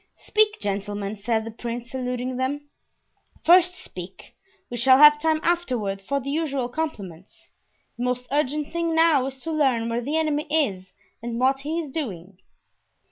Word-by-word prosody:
"Speak, 425 0 +2
gentlemen," 205 0 -3
said 220 +2 -1
the 225 - -6
prince, 235 +1 -6
saluting 250 0 -3
them; 285 +3 -3 0.7
"first 360 +1 +6
speak; 185 - -10 0.4
we - - -3
shall 260 +2 +5
have 295 +1 +8
time 315 0 +1
afterward 250 - -1
for 280 +8 -1
the 275 +1 -5
usual 280 -5 -1
compliments. 200 - -6 0.5
The 245 - -1
most 250 0 -2
urgent 295 +1 -1
thing 335 -1 0
now 320 -5 +4
is 265 0 -7
to 325 - -4
learn 260 -7 +1
where 230 +1 -1
the 290 +6 -1
enemy 305 -1 0
is 200 -13 0 0.3
and 235 0 -4
what 265 +1 +2
he 305 +4 -3
is 305 -5 -5
doing." 195 - -6
260 Hz, 160 wpm, -24 LUFS, 230-305 Hz, 0.7 s, have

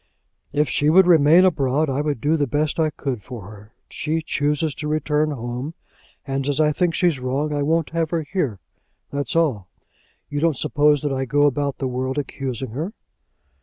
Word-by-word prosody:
"If 150 +1 +1
she 145 +3 +1
would 185 +4 +6
remain 165 +1 +6
abroad, 150 -3 +1
I 135 +1 -1
would 150 -4 -2
do 155 +5 +2
the 145 -3 0
best 150 +4 -1
I 160 -1 +3
could 135 -6 -4
for 110 -4 -9
her. 105 0 -14 0.2
She 160 +1 -2
chooses 150 0 0
to 150 - -5
return 150 0 +1
home; 125 +3 -5 0.5
and 135 0 -2
as 145 +1 0
I 150 -1 +4
think 170 +2 0
she's 170 -7 +2
wrong, 135 +4 -1
I 145 - -1
won't 160 +2 +1
have 165 -1 -1
her 165 0 -1
here; 145 - -2 0.5
that's 140 -1 -2
all. 135 - +1 0.6
You 145 - -3
don't 160 -3 +1
suppose 150 -1 +2
that 145 -2 0
I 135 0 -1
go 145 +3 +2
about 145 -1 0
the 135 - -2
world 130 +2 -3
accusing 130 -4 -4
her?" 160 - -4
145 Hz, 190 wpm, -22 LUFS, 135-155 Hz, 0.6 s, would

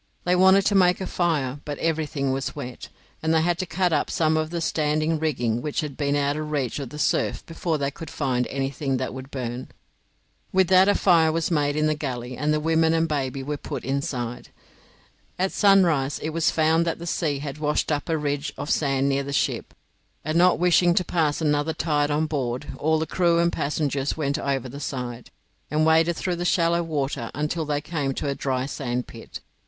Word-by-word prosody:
They 180 +1 +2
wanted 190 +1 +5
to 205 - +2
make 180 -2 +4
a 190 - -3
fire, 150 -8 -1
but 145 -1 -5
everything 155 -4 -1
was 135 0 -3
wet, 125 -4 -7 0.3
and 160 - 0
they 160 -1 +3
had 175 0 +1
to 185 - -2
cut 180 0 0
up 145 - +1
some 160 -1 +1
of 155 0 0
the 170 0 -3
standing 155 0 0
rigging 120 -7 0
which 150 +1 -2
had 150 -3 -5
been 145 0 0
out 145 0 +1
of 155 0 -4
reach 145 -3 -1
of 135 -4 -5
the 150 - -9
surf - - 0
before 165 -1 -2
they 140 -1 -1
could 165 +3 -9
find 125 -4 -1
anything 135 0 -2
that 130 0 -3
would 130 0 -8
burn. 125 -2 -5 0.8
With 190 -1 +3
that 185 +1 +6
a 205 - +4
fire 165 -4 +4
was 165 +2 -1
made 145 -2 +1
in 155 0 +1
the 155 - +2
galley, 125 -4 -4
and 150 +3 0
the 155 - +2
women 160 +1 +2
and 165 0 +2
baby 135 -3 -2
were 145 +2 -3
put - - -6
inside. 130 -3 -3 0.9
At 190 +1 0
sunrise 175 -9 +3
it 155 - -4
was 165 0 +2
found 160 +1 +3
that 165 - -1
the 170 - -8
sea 160 -4 -1
had 140 +1 -6
washed 150 +1 0
up 145 +1 -2
a 160 - +1
ridge 145 -1 -2
of 150 - -3
sand 135 -2 +1
near 140 0 +1
the 140 0 -5
ship, 140 - -1 0.5
and, 155 +1 -1
not 180 +1 +5
wishing 175 0 +4
to 180 - +3
pass 160 -3 0
another 150 +1 +1
tide 150 -3 0
on 150 +2 +1
board, 130 -5 -2
all 160 +1 +2
the 160 - -1
crew 170 0 +2
and 170 0 +2
passengers 145 -1 -1
went 140 -2 -1
over 135 -2 -1
the 140 +3 -8
side, 125 -4 -5 0.4
and 155 +2 +2
waded 160 +1 +4
through 180 -2 -2
the 175 - -3
shallow 170 -1 +2
water 140 -7 -2
until 150 +3 -1
they 145 -1 -1
came 145 -4 -2
to - - -3
a 140 - 0
dry 130 -2 -2
sand 125 -3 -3
pit. - - -10
150 Hz, 210 wpm, -24 LUFS, 140-165 Hz, 0.9 s, that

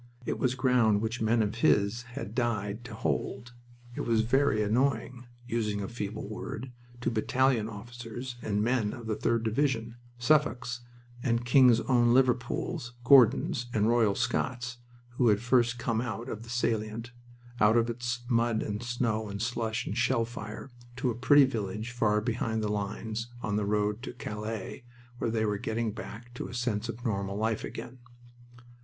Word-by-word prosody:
It - - -2
was 130 0 +1
ground 125 -5 +3
which 115 +2 -3
men 110 +1 +3
of 105 +2 -3
his 105 +3 +3 0.2
had 105 - -5
died 115 -3 -1
to 110 -3 -7
hold. 95 - -2 0.4
It - - -3
was 115 -2 +2
very 120 -1 +2
annoying 120 +2 0 0.2
using 110 -4 -1
a 100 - -3
feeble 105 -2 -5
word 110 +4 -6 0.3
to - - 0
battalion 120 0 +2
officers 120 +3 -7
and 105 0 0
men 115 -3 +1
of 120 - -8
the 110 -1 -1
3d 115 +1 0
Division 115 -1 0 0.2
Suffolks 125 -2 +1 0.4
and 120 -1 0
King's 125 -2 +6
Own 120 -2 +3
Liverpools, 120 -1 0
Gordons 120 -1 +5
and 105 0 +3
Royal 115 -4 +3
Scots 120 -2 -1 0.4
who 125 - +4
had 105 -2 +4
first 120 0 +2
come 115 -1 0
out 120 +1 -4
of 110 - -5
the 115 - -11
salient, 115 -1 -1 0.5
out 105 +2 +5
of 115 0 +3
its 120 +1 -3
mud 115 -2 +2
and 105 +1 -3
snow 120 -3 -1
and 100 0 -5
slush 115 0 -1
and 100 - -3
shell 120 -1 +2
fire, 110 +2 -8 0.2
to 125 0 0
a - - -4
pretty 140 +4 +6
village 110 -2 -3
far 105 -3 +2
behind 110 -1 -1
the 105 - 0
lines, 110 +2 -3 0.2
on 105 -2 -1
the 105 -1 0
road 105 +1 0
to 130 - -6
Calais, 110 +1 -5 0.4
where - - 0
they 110 -1 +1
were 105 -1 -1
getting 110 +1 -1
back 120 +2 -9
to 120 - -5
a - - -8
sense 120 -2 -1
of 120 +2 -6
normal 100 -3 -1
life 110 0 0
again. 125 +1 -7
115 Hz, 170 wpm, -29 LUFS, 110-120 Hz, 0.5 s, King's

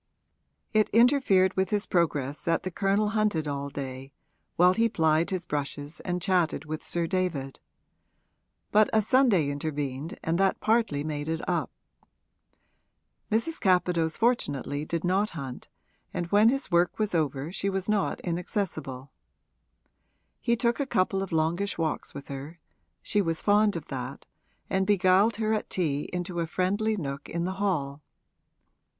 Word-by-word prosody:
It 215 -1 +3
interfered 230 -6 +4
with 190 -1 +1
his 205 -1 0
progress 150 -5 0
that 165 -1 +1
the 185 - -3
Colonel 200 +3 +1
hunted 210 -8 0
all 140 0 -3
day, 135 -1 -6 0.4
while 180 +1 +5
he 230 +3 +2
plied 160 -4 +2
his 185 -2 -3
brushes 145 +1 -4
and 180 -1 -2
chatted 175 -6 +1
with 155 0 -4
Sir 170 -1 -1
David; 165 -7 -2 1.1
but 215 0 +5
a 220 - +5
Sunday 220 - +4
intervened 145 0 -4
and 165 +2 0
that 195 0 +2
partly 220 -11 +1
made 150 0 -3
it 165 0 -3
up. - - 0 1.6
Mrs. 230 +10 0
Capadose 180 -4 +2
fortunately 145 - 0
did 170 +1 -2
not 190 +4 +2
hunt, 135 -4 -7 0.5
and 175 - -1
when 210 +2 +6
his 275 -4 -1
work 175 +1 +2
was 215 -3 -1
over 150 -2 -1
she 195 +1 -1
was 195 -1 -2
not 210 -2 0
inaccessible. 160 -7 -3 1.3
He 235 -1 +1
took 235 +2 0
a 280 - -1
couple 190 -3 +1
of 195 - -5
longish 165 +5 0
walks 160 -2 -2
with 140 - -8
her 140 +5 -7 0.4
(she 205 - +1
was 165 -3 0
fond 205 0 +3
of 165 -3 -5
that), 130 0 -6 0.4
and 190 0 0
beguiled 200 +2 +4
her 220 0 0
at 215 - -2
tea 150 -5 -1
into 180 0 -3
a 165 - -1
friendly 205 +6 0
nook 140 -4 -5
in 170 0 -2
the 190 +1 -3
hall. 150 -8 -1
175 Hz, 150 wpm, -27 LUFS, 150-205 Hz, 1.6 s, when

